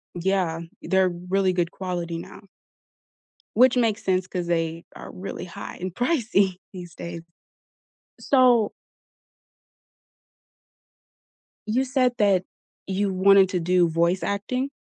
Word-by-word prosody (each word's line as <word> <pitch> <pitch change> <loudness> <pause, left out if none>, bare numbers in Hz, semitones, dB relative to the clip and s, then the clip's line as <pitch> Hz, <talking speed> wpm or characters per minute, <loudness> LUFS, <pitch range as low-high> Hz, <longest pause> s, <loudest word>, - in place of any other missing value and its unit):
Yeah, 175 -2 0 0.2
they're 190 -1 +2
really 180 +2 0
good 175 -1 0
quality 175 -3 -4
now. 170 - -10 1.1
Which 255 +2 +5
makes 225 -3 +1
sense 185 -1 0
'cause 180 -2 -4
they 165 -1 -1
are - - -9
really 185 0 -7
high 175 - -8
and 185 -1 -5
pricey 235 - +1 0.2
these 175 -2 -9
days. 170 -1 -7 1.0
So 250 -5 +4 3.0
You 245 +5 +1
said 255 -1 +1
that 195 -3 +3 0.4
you 195 +1 -1
wanted 190 0 +5
to 180 - -1
do 175 0 +3
voice 170 +3 +1
acting? 250 +7 -2
185 Hz, 115 wpm, -24 LUFS, 175-210 Hz, 3.0 s, Which